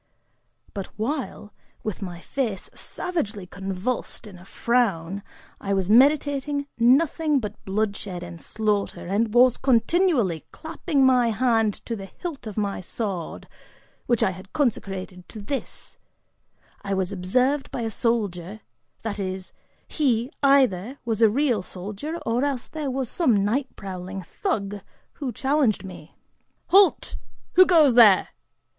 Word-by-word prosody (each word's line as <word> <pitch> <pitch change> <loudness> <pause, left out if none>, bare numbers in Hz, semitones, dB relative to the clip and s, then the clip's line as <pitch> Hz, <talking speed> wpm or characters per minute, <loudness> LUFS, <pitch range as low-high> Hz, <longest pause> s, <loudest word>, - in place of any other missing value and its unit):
But 195 -2 -5
while, 220 -3 -3 0.3
with 215 -2 -4
my 175 -3 -6
face 220 -1 -3
savagely 215 - -4
convulsed 190 +7 -4
in 195 -4 -11
a 180 - -15
frown, 200 -6 0 0.4
I 200 0 -1
was 190 +1 0
meditating 285 +2 +3
nothing 295 +4 +3
but 210 -3 -7
bloodshed 195 -2 -2
and 170 -1 -9
slaughter, 210 -2 -1
and 210 +5 0
was 245 +1 +5
continually 250 - +2
clapping 315 -3 0
my 250 -2 +4
hand 225 -2 +2
to 230 - -3
the 195 -2 -8
hilt 285 - -7
of 215 - -7
my 200 -2 -1
sword, 190 -3 -5 0.6
which 240 -3 +2
I 190 - +2
had 185 +1 -12
consecrated 195 - -2
to 220 - -9
this, 265 +7 -6 0.8
I 195 -1 -1
was 190 0 -1
observed 250 +10 +1
by 245 - -4
a 225 -1 -2
soldier, 210 -4 -1 0.4
that 210 -2 -3
is, 185 -1 -4 0.3
he 255 -4 0
either 265 -4 +3
was 225 -1 -1
a 225 - +7
real 245 -2 +1
soldier, 205 - -6
or 235 +3 +1
else 275 -4 -2
he 305 -2 -3
was 265 -1 -2
some 225 - +2
night 260 +6 0
prowling 185 0 -6
thug, 205 - -3 0.4
who 275 -4 -2
challenged 265 -2 +1
me. 180 -5 -11 0.5
"Halt! 390 +1 +4 0.4
Who 370 0 +7
goes 315 -7 +6
there? 220 -5 +7
220 Hz, 135 wpm, -24 LUFS, 195-270 Hz, 0.8 s, a